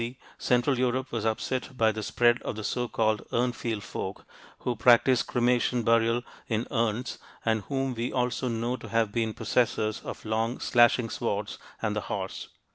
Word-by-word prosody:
C. 120 +2 -4 0.2
central 125 +1 +2
Europe 130 +1 0
was 115 -2 -1
upset 125 +3 -2
by 110 -2 +4
the 110 0 -5
spread 120 +3 +2
of - - -4
the 110 - -5
so 125 +3 -1
called 110 -2 +1
Urnfield 120 -3 -1
folk, 95 -3 -6 0.4
who 125 - -1
practiced 120 +2 +5
cremation 120 0 +2
burial 115 +1 +3 0.2
in 115 0 0
urns 115 +1 -1 0.3
and 110 -1 +2
whom 135 -1 -1
we 120 +1 -2
also 125 0 0
know 120 +1 -1
to - - -10
have 115 -2 +1
been 110 -1 -1
possessors 110 -3 0
of - - -8
long, 115 +3 -1
slashing 120 -1 +4
swords 105 -3 -2 0.2
and - - 0
the - - -1
horse. - - -4
120 Hz, 170 wpm, -28 LUFS, 110-125 Hz, 0.4 s, practiced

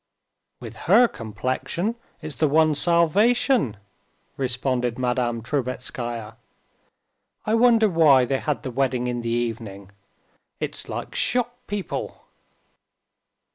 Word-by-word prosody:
"With - - -9
her 245 - +7
complexion, 130 - -3 0.3
it's 155 -1 -4
the 155 - +3
one 155 +2 +4
salvation," 175 - +3 0.6
responded 125 -2 -1
Madame 125 -2 -1
Trubetskaya. 120 -4 -4 1.1
"I 215 - 0
wonder 230 -1 +5
why 155 -8 +5
they 135 +1 -1
had 150 -2 -2
the 130 - -4
wedding 125 -1 0
in 120 -1 -2
the 115 - -3
evening? 115 -5 -4 0.7
It's - - -4
like - - -5
shop 245 -1 0
people...." 205 -2 -5
130 Hz, 105 wpm, -24 LUFS, 120-170 Hz, 1.1 s, her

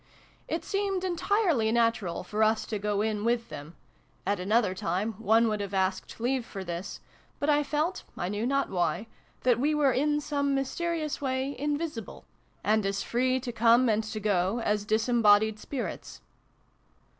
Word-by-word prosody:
It - - -3
seemed 390 -2 -1
entirely 350 - +1
natural 230 -7 +1
for 210 +4 -3
us 220 0 +3
to 215 - -3
go 205 0 0
in 215 -1 -1
with 235 0 0
them: 145 +4 -9 0.5
at 200 0 0
another 205 +1 +2
time 190 +4 -2
one 225 +1 +4
would 215 -1 -1
have 200 -1 -4
asked 190 +2 -1
leave 250 +2 0
for 195 -4 -7
this, 175 +1 -6 0.4
but 295 +1 +2
I 295 0 +4
felt, 300 +5 -1 0.2
I 175 - -2
knew 210 +4 -2
not 275 +1 0
why, 175 +2 0 0.4
that 245 -2 +3
we 300 +4 +2
were 290 -3 +4
in 295 +3 +1
some 285 -1 0
mysterious 310 +3 -2
way 265 0 -1
invisible, 290 - -4 0.4
and 215 +1 +2
as 195 0 -1
free 255 +2 +1
to 245 -1 -4
come 235 +2 +4
and 220 0 +2
to 215 0 -5
go 200 +1 +1
as 210 -2 0
disembodied 220 -1 +3
spirits. 265 +3 -6
230 Hz, 165 wpm, -28 LUFS, 205-275 Hz, 0.5 s, one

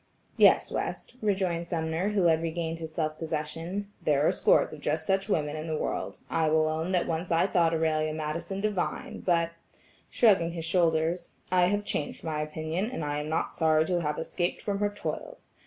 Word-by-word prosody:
"Yes, - - +5
West," - - -4
rejoined 190 -5 0
Sumner 165 +3 -1
who 205 -3 +1
had 165 -2 +4
regained 165 0 -3
his 160 -1 -6
self 155 -1 -2
possession, 165 +5 -3 0.2
"there 150 -3 +2
are - - +5
scores - - +3
of 155 - -8
just 155 +2 -1
such 195 +3 +1
women 150 -5 0
in 155 +1 -5
the 155 -1 -1
world: - - -3
I 160 -1 +1
will 155 0 +3
own 160 +3 -1
that 180 -2 +2
once 165 +2 -2
I 165 +1 +3
thought 175 -4 +3
Aurelia 155 -1 +1
Madison 160 +5 -3
divine, 205 -4 -2
but," 170 -2 +1 0.6
shrugging 190 -8 +4
his 165 -2 -4
shoulders, 165 0 +1 0.2
"I 180 -1 +5
have 205 +2 0
changed 145 - -3
my 155 -2 -2
opinion, 160 +6 -2
and 205 -12 -4
I 145 0 -1
am 150 +1 -4
not 160 - -1
sorry 155 -1 +3
to 175 0 0
have 150 -2 -1
escaped 175 +2 -2
from 200 -1 -1
her 205 0 +2
toils. - - -6
165 Hz, 190 wpm, -28 LUFS, 155-180 Hz, 0.6 s, Yes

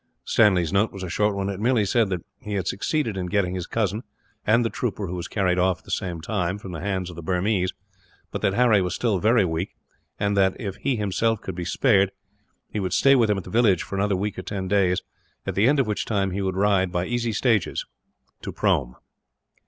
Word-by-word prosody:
Stanley's 95 -7 +3
note 105 +2 +2
was 95 -1 -8
a 90 - -5
short 105 -1 +1
one. 100 0 -2
It 100 -1 -3
merely 115 -1 +2
said 110 +1 +2
that 90 -3 -3
he 105 -5 -6
had 95 -4 -1
succeeded 120 +1 -1
in 90 -2 -3
getting 90 -1 0
his 90 -1 -4
cousin, 110 -1 -1 0.5
and 115 +2 +4
the 115 - -1
trooper 105 -4 -2
who 90 - -5
was 90 0 -4
carried 90 -3 +1
off 90 0 +2
at - - -26
the - - -9
same 85 -3 -2
time, 90 0 -1
from 100 -2 -9
the 80 - -5
hands 95 -2 -2
of - - -11
the 85 - -7
Burmese, 90 +2 0 0.6
but - - -4
that 100 - +1
Harry 120 -4 +4
was 90 -1 -1
still 110 -6 +1
very 110 +1 +4
weak; 80 +2 -3 0.4
and 100 0 +1
that, 95 -1 +2
if 100 -5 -5
he 135 - 0
himself 110 +1 0
could 95 - -5
be 85 0 -5
spared, 100 -1 +3 0.6
he 105 - -4
would 95 -2 -2
stay 140 - +5
with 120 -5 +4
him 105 - +2
at 95 - -4
the - - -10
village 110 -6 +3
for - - -10
another 100 0 +1
week 100 +2 -3
or - - -3
ten 95 -2 -4
days, 95 -2 +2 0.4
at - - -2
the 100 +4 +3
end 145 +1 +3
of 135 - +3
which 105 -1 -1
time 100 -3 0
he 100 +2 -2
would 95 -1 -1
ride, 95 -2 +2
by 90 0 -1
easy 120 0 -1
stages, 110 -2 +1 0.6
to - - -5
Prome. - - 0
100 Hz, 235 wpm, -24 LUFS, 90-110 Hz, 0.6 s, stay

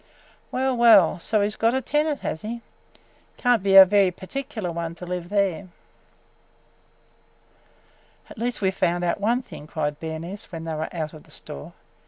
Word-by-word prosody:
Well, 260 0 0
well! 220 -8 +6
So 215 +4 +1
he 200 - +2
's 210 - -5
got 230 +2 +2
a - - +2
tenant, 295 +2 0
has 160 - -4
he? 230 +2 -5 0.8
Can't 245 -4 +2
be 195 0 +2
a 195 0 +12
very 200 0 +4
perticaler 215 0 -5
one 170 0 -4
to 180 - -9
live 180 -1 -5
there!" 200 -2 0 2.6
"At - - -12
least 240 -1 -2
we 190 - +3
've - - -19
found 175 -1 0
out 175 - 0
one 240 +5 +1
thing!" 150 - -11
cried 150 -2 -3
Bernice 165 +6 -6
when 165 -2 -6
they 165 -1 -4
were 155 +1 -3
out 155 -3 -4
of 155 - -13
the - - -23
store. 70 - -9
195 Hz, 180 wpm, -24 LUFS, 170-230 Hz, 2.6 s, a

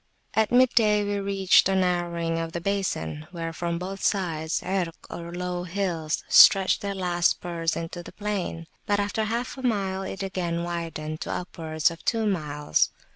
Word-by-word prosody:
At 220 -1 +2
mid 255 +1 +6
day 210 -3 +3
we 205 0 -1
reached 195 -1 +4
a 195 - +2
narrowing 175 -2 0
of 165 0 -4
the 170 - -2
basin, 170 - -2
where, 165 -2 -5
from 170 0 -2
both 190 +2 -6
sides, 165 -5 0
Irk, 180 -3 -1 0.2
or 170 0 -6
low 180 0 -3
hills, 175 -4 -2
stretch 195 -2 +7
their 200 -1 -3
last 175 -2 +2
spurs 170 -1 -2
into 165 +1 -5
the - - -11
plain. 200 -5 -3 0.2
But 205 0 +2
after 205 +2 0
half 235 +5 -3
a - - -6
mile, 195 -6 0
it 195 0 -5
again 175 -3 -2
widened 165 -3 -4
to - - -3
upwards 160 -3 -1
of 170 - -11
two 225 -2 +1
miles. 150 -7 +1
180 Hz, 175 wpm, -26 LUFS, 165-200 Hz, 0.2 s, stretch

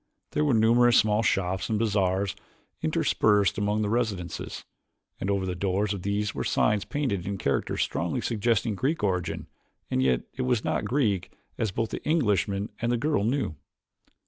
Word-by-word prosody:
There 150 - +1
were 145 -5 +3
numerous 120 +2 +5
small 105 0 +3
shops 95 -5 0
and 110 - +1
bazaars 100 -3 +1 0.5
interspersed 105 -2 +2
among 105 +1 +1
the - - 0
residences, 105 -7 -2 0.5
and 95 - -2
over 100 -1 +1
the 90 - -2
doors 100 +3 0
of 100 - -5
these 100 +2 -1
were - - -3
signs 105 -2 +1
painted 125 - -2
in 100 0 -2
characters 70 -7 0
strongly - - -2
suggesting 115 -1 +1
Greek 135 - -1
origin 90 -3 -1 0.5
and 65 - +2
yet 65 -2 +2
it 135 - -4
was 125 -3 +1
not - - 0
Greek 110 -9 0 0.3
as 110 - +1
both 110 +4 -2
the - - -5
Englishman 105 - +1
and 115 +1 +1
the 120 - +2
girl 135 -4 +1
knew. 125 - 0
105 Hz, 170 wpm, -27 LUFS, 95-115 Hz, 0.5 s, numerous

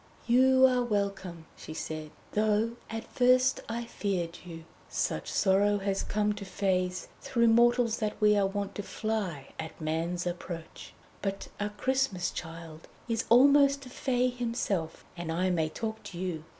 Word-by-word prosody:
"You 260 +2 +6
are 250 -1 +3
welcome," 195 -6 -2
she 155 - -9
said, 155 -1 -5 0.2
"though 215 +1 +2 0.2
at 225 0 -4
first 255 +1 +4
I 235 +1 -3
feared 180 -7 -3
you. 165 -2 -9 0.3
Such - - -2
sorrow 205 +1 +3
has 195 -1 -1
come 210 0 0
to 205 -1 -7
Fées 185 -2 -1 0.2
through 235 -2 +2
mortals 235 0 +4
that 210 -1 -2
we 210 -1 +5
are 200 -1 +3
wont 200 0 -3
to - - -4
fly 200 -10 -3
at 160 0 -6
man's 165 +3 -2
approach. 175 -1 -6 0.3
But 195 -1 -3
a 205 0 -1
Christmas 255 -4 0
Child 165 -1 -8 0.2
is 230 -1 -1
almost 280 +3 +6
a - - -10
Fée 250 -1 0
himself, 220 -9 -2
and 170 -2 -4
I 185 +3 +1
may 160 -3 +1
talk 220 +5 -4
to 175 - -8
you. 175 -4 -4
205 Hz, 155 wpm, -29 LUFS, 175-235 Hz, 0.3 s, You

